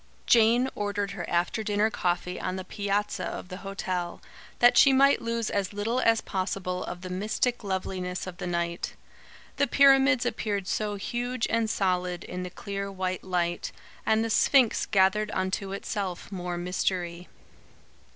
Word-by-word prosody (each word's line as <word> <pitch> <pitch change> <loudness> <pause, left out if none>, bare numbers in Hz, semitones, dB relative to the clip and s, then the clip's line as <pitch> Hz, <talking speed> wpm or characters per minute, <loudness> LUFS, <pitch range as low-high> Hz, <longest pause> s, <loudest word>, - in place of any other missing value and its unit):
Jane 235 +2 +5
ordered 205 -1 -2
her - - -6
after 175 +5 0
dinner 210 0 +1
coffee 180 -1 -1
on 185 - -3
the 190 - -4
piazza 205 +1 -2
of 180 - -5
the 185 - -6
hotel, 185 -3 -4 0.4
that 245 0 +6
she 275 - +7
might 275 +1 +5
lose 230 -1 -2
as 200 -1 -1
little 220 +5 -1
as 230 -3 +3
possible 185 -1 -3
of 175 0 -6
the 185 - -7
mystic 215 +6 -1
loveliness 185 -2 -3
of 180 -2 -8
the 180 - -4
night. 170 0 -2 0.6
The 280 +1 +3
pyramids 270 -1 +5
appeared 210 -5 -2
so 210 0 -1
huge 240 +4 -2
and 225 -1 +1
solid, 180 -3 0
in 180 - -6
the 180 - -4
clear 200 +2 -5
white 185 -1 -3
light; 175 -2 -1 0.3
and 220 +1 +2
the 225 - -2
Sphinx 255 0 +4
gathered 205 +1 +3
unto 190 +1 -1
itself 195 -2 -4
more 180 -2 -4
mystery. 175 0 -2
195 Hz, 155 wpm, -27 LUFS, 180-220 Hz, 0.6 s, she